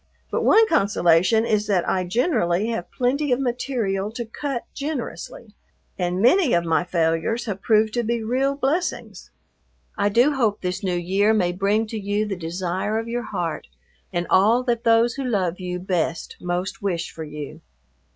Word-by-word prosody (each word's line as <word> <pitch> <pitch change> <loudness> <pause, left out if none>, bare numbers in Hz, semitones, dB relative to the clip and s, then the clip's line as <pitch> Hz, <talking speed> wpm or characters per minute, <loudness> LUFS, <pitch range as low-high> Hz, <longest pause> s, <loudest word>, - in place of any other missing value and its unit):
But - - 0
one 450 0 +6
consolation 200 - +3
is 215 -2 0
that 190 -4 +1
I 185 -1 0
generally 205 - +1
have 225 -7 -3
plenty 270 +3 0
of 245 - +2
material 240 -6 -1
to 235 0 -4
cut 250 +2 -4
generously, 275 -6 -6 0.4
and 180 -1 -1
many 320 +2 +4
of 170 0 +2
my 165 +1 +2
failures 170 +6 0
have 200 -4 -4
proved 215 -1 +3
to 240 - 0
be 235 0 -1
real 265 +5 0
blessings. 285 +6 -2 0.7
I 205 0 +1
do 245 +8 +4
hope 225 -7 0
this 180 +1 -3
New 180 -2 0
Year 195 +5 +2
may 180 -4 +2
bring 200 +4 +1
to 220 0 -5
you 205 +1 -1
the 205 -2 -3
desire 180 +4 -2
of 225 +1 -3
your 240 0 -3
heart 165 - -3 0.4
and 175 0 -1
all 220 +6 +4
that 235 -2 -1
those 230 +1 +4
who 275 - -4
love 190 -8 -1
you 180 -1 -4
best 175 -3 -2
most 180 +1 -3
wish 180 -4 -2
for 160 - -7
you. 150 -2 -8
210 Hz, 170 wpm, -23 LUFS, 180-240 Hz, 0.7 s, one